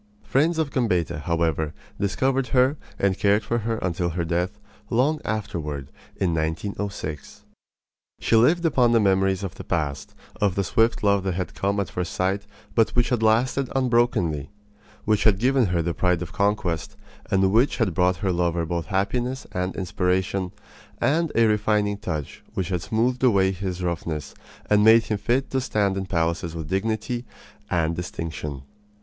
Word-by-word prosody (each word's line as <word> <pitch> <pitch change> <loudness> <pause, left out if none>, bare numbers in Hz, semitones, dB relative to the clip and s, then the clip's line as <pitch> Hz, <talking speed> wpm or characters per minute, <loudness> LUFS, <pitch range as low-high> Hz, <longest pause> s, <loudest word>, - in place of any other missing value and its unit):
Friends 160 +5 +2
of 155 -3 0
Gambetta, 90 - 0
however, 80 -1 -1 0.2
discovered 130 +6 +1
her 130 +4 +3 0.2
and 100 -2 +1
cared 105 +2 +3
for 120 +3 -1
her 115 +1 -2
until 90 -1 0
her 85 0 -2
death, 90 +4 -1 0.3
long 145 +6 +2
afterward, 75 -10 -3 0.3
in 90 -3 0
1906. 80 -1 -4 0.8
She - - +2
lived 160 +10 +4
upon 125 -6 +3
the 115 - +5
memories 95 -1 +2
of 95 - -4
the - - -9
past, 75 -6 -3 0.2
of 100 -3 +1
the 100 - +1
swift 115 +6 +1
love 100 -1 +3
that 95 -2 -1
had 90 0 -3
come 100 +1 -1
at 100 - -2
first 90 -1 -3
sight, 95 +2 -1 0.3
but 115 -1 +3
which 120 0 +3
had 125 -4 0
lasted 120 +4 +2
unbrokenly; 120 - +1 0.6
which 105 -1 +2
had 105 -3 +5
given 130 +1 +3
her 85 -2 0
the 85 +1 -1
pride 90 +1 +1
of 85 - -9
conquest, 100 -5 -1 0.3
and 95 0 +3
which 120 +7 +3
had 110 -8 +1
brought 90 +2 +2
her 95 - +2
lover 85 -1 0
both 85 0 -3
happiness 120 +7 -1
and 90 +1 -2
inspiration 90 0 -1 0.5
and 155 +6 +1
a 115 - +5
refining 105 -1 +1
touch 75 -7 -5
which 95 -3 -2
had 90 -2 -1
smoothed 120 +7 0
away 100 -6 +4
his 95 -1 -4
roughness 80 -3 -3 0.3
and 105 0 +4
made 115 +1 +7
him 105 -2 -2
fit 120 +6 0
to 130 - +1
stand 105 -6 0
in 95 -1 -3
palaces 85 -1 -1
with 80 -2 -6
dignity 110 +5 -1 0.5
and 85 -2 +1
distinction. 75 -5 -5
100 Hz, 165 wpm, -24 LUFS, 85-115 Hz, 0.8 s, made